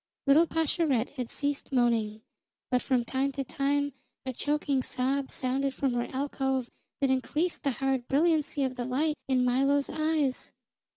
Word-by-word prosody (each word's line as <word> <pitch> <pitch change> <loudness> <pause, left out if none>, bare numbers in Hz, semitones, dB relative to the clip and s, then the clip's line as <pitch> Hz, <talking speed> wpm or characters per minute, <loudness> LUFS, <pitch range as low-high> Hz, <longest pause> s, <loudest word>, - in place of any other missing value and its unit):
Little 305 +4 +6
Pascherette 315 -6 +1
had 250 -4 -5
ceased 285 -1 -2
moaning, 225 -4 +1 0.5
but 250 -1 +3
from 250 -3 +1
time 265 +3 0
to 275 - -2
time 285 +1 0 0.3
a 260 - -3
choking 290 0 0
sob 265 +2 -1
sounded 270 +1 -1
from 270 -3 0
her 240 0 -1
alcove 265 -2 -1 0.3
that 275 -1 +3
increased 300 +6 0
the 285 - +1
hard 265 -1 -1
brilliancy 300 -1 +2
of 255 -1 -2
the 245 - -2
light 290 +5 +1
in 255 -2 +2
Milo's 275 +3 +2
eyes. 310 -4 0
270 Hz, 155 wpm, -29 LUFS, 255-285 Hz, 0.5 s, Little